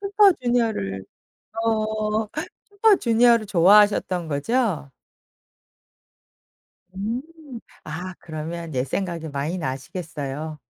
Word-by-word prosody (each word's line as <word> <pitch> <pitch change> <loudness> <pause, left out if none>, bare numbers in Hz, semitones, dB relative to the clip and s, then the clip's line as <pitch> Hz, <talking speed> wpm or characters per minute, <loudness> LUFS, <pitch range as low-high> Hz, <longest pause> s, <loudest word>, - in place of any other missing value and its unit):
슈퍼주니어를 245 - +2 0.6
어. 215 -1 0 0.4
슈퍼주니어를 240 - +4
좋아하셨던 190 -1 +4
거죠? 160 - 0 2.1
음. 220 +6 -2 0.6
아 180 +4 -6
그러면 160 0 -6
옛 125 0 +1
생각이 170 0 -3
많이 145 +5 -3
나시겠어요. 150 +1 -5
185 Hz, 200 characters per minute, -23 LUFS, 155-225 Hz, 2.1 s, 슈퍼주니어를